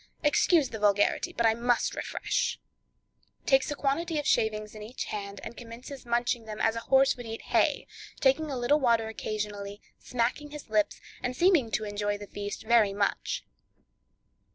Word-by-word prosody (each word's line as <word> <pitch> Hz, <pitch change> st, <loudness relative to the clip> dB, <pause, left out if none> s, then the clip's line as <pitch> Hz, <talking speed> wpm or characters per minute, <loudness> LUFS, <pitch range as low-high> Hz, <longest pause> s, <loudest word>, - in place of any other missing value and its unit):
Excuse 295 Hz, 0 st, +4 dB
the 220 Hz, -, -6 dB
vulgarity, 205 Hz, -1 st, +2 dB
but 235 Hz, -, 0 dB
I 225 Hz, -, +5 dB
must 240 Hz, +1 st, +1 dB
refresh" -, -, -2 dB, 0.9 s
(takes 270 Hz, +1 st, +3 dB
a 295 Hz, -, -2 dB
quantity 310 Hz, +4 st, -1 dB
of 295 Hz, -, -2 dB
shavings 215 Hz, -1 st, +1 dB
in 215 Hz, -, -10 dB
each 225 Hz, +5 st, -5 dB
hand 200 Hz, -1 st, -5 dB
and 235 Hz, -, -7 dB
commences 245 Hz, +3 st, -10 dB
munching 235 Hz, 0 st, 0 dB
them 215 Hz, -1 st, -7 dB
as 225 Hz, -, +2 dB
a -, -, -2 dB
horse 270 Hz, 0 st, +5 dB
would 245 Hz, -2 st, -9 dB
eat 225 Hz, 0 st, -6 dB
hay, -, -, +2 dB, 0.3 s
taking 285 Hz, +3 st, +3 dB
a 270 Hz, -, -3 dB
little 250 Hz, +5 st, +3 dB
water 230 Hz, -4 st, +2 dB
occasionally, 205 Hz, -2 st, -4 dB, 0.2 s
smacking 250 Hz, +5 st, -1 dB
his 295 Hz, -6 st, -10 dB
lips, 210 Hz, -1 st, +1 dB, 0.2 s
and 250 Hz, 0 st, -2 dB
seeming 345 Hz, -10 st, +4 dB
to 215 Hz, -, -1 dB
enjoy 205 Hz, 0 st, -2 dB
the 205 Hz, -, -8 dB
feast 205 Hz, 0 st, -6 dB
very 220 Hz, -3 st, +4 dB
much). 200 Hz, 0 st, -1 dB
230 Hz, 170 wpm, -28 LUFS, 210-270 Hz, 0.9 s, I